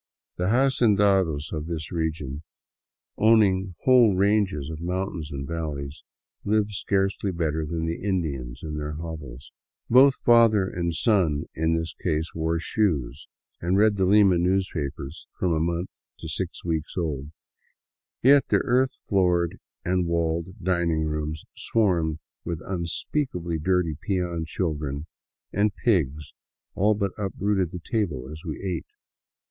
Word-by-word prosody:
The 90 - -1
hacendados 100 - +3
of 75 0 -4
this 80 -2 -4
region, 80 -4 -3 0.8
owning 95 -4 +4
whole 125 -6 +6
ranges 95 -6 +1
of 80 0 -7
moun 90 +3 -1
tains 80 -4 -6
and 70 -1 -5
valleys, 75 -4 -4 0.4
live 105 0 +1
scarcely 95 0 0
better 80 -3 -1
than 80 +1 -2
the 80 +1 -3
Indians 70 -11 -2
in 75 -1 -4
their 75 0 -4
hovels. 75 -5 -8 0.4
Both 130 +3 +7
father 115 -5 +5
and 85 -3 -2
son 85 -6 +2
in 80 +1 +1
this 80 0 -2
case 80 -1 -2
wore 80 0 0
shoes 85 - -1 0.3
and 90 +3 +1
read 105 0 +4
the 95 - +2
Lima 95 -2 +5
news 95 +2 +1
papers 70 0 -5
— - - -65
from 90 -2 +1
a 80 - +1
month 85 +2 -1 0.3
to - - -8
six - - -4
weeks 80 -1 -2
old 75 -5 -2 0.5
— - - -69
yet 140 +2 +6
their - - +2
earth 130 +1 +2
floored 90 -4 +2 0.3
and 90 -1 +1
walled 85 +1 -1
dining 85 -3 +1
room 75 0 -2 0.2
swarmed 85 -8 +1 0.3
with 85 -2 -3
unspeakably 85 - -2
dirty 90 -1 +1
peon 90 -4 -1
children, 75 -4 -3 0.5
and 105 +1 +1
pigs 75 - 0 0.4
all 105 +2 +3
but 100 -2 -1
uprooted 100 -2 0
the 90 - -6
table 95 - -1
as 80 +1 -9
we 80 -5 -5
ate. 90 -4 -3
85 Hz, 140 wpm, -25 LUFS, 80-100 Hz, 0.8 s, Both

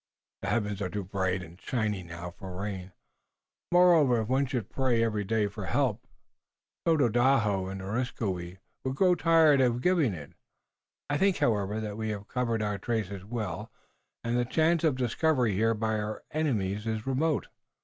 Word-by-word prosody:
"The 100 - -4
heavens 105 -1 -1
are - - -1
too 105 -1 -3
bright 95 -1 -1
and 85 +2 -14
shining 105 -7 -2
now 85 +1 -7
for 95 0 -9
rain. 95 -2 -5 0.8
Moreover, 170 -9 +5
if 110 - -5
one 135 +2 +2
should 125 -5 -3
pray 125 -4 +2
every 105 -2 0
day 110 +1 +1
for 100 -1 -5
help, 125 -4 0 0.8
Tododaho 120 - +3
and 95 0 -5
Areskoui 95 -5 -3 0.3
would 130 0 -2
grow 185 +3 +4
tired 160 -5 +5
of 120 -2 +2
giving 155 - +2
it. 75 -4 -10 0.7
I 145 0 0
think, 195 0 +3
however, 105 -1 +1
that 105 -1 -5
we 110 0 -2
have 105 -1 -5
covered 115 -3 -1
our 105 -1 -2
traces 100 -5 -3
well, 105 -5 -4 0.5
and 115 +1 -1
the 125 - +2
chance 160 +6 +2
of 155 -5 +3
discovery 125 -1 +1
here 115 +4 +2
by 110 0 -1
our 105 +1 -4
enemies 110 -9 -1
is 110 -1 -2
remote." 140 +3 0
110 Hz, 165 wpm, -29 LUFS, 100-130 Hz, 0.8 s, Moreover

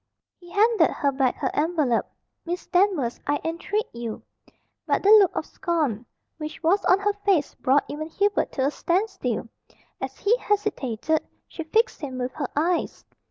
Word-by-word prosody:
He 350 -1 -15
handed 435 +4 +4
her 280 - 0
back 265 -2 +1
her 265 - -2
envelope. 300 -6 +1 0.4
"Miss 350 +2 -4
Danvers, 355 - +1
I 290 +1 +1
entreat 370 +7 -2
you 235 -2 -6 0.3
" - - -47
But - - +1
the 405 - +5
look 415 -4 +7
of - - -2
scorn 290 - -2 0.3
which 310 +1 -7
was 380 +5 +3
on 370 - +5
her 405 +1 0
face 365 -8 +2
brought 270 +2 +2
even 310 +2 -5
Hubert 405 +4 +1
to 265 - 0
a 280 - +1
standstill. 345 - -1 0.5
As - - -5
he 420 +3 +3
hesitated, 315 - 0 0.3
she - - -7
"fixed 440 +6 +1
him 265 -4 -5
with 250 0 -2
her - - -4
eyes." 335 +4 0
325 Hz, 165 wpm, -25 LUFS, 275-395 Hz, 0.5 s, look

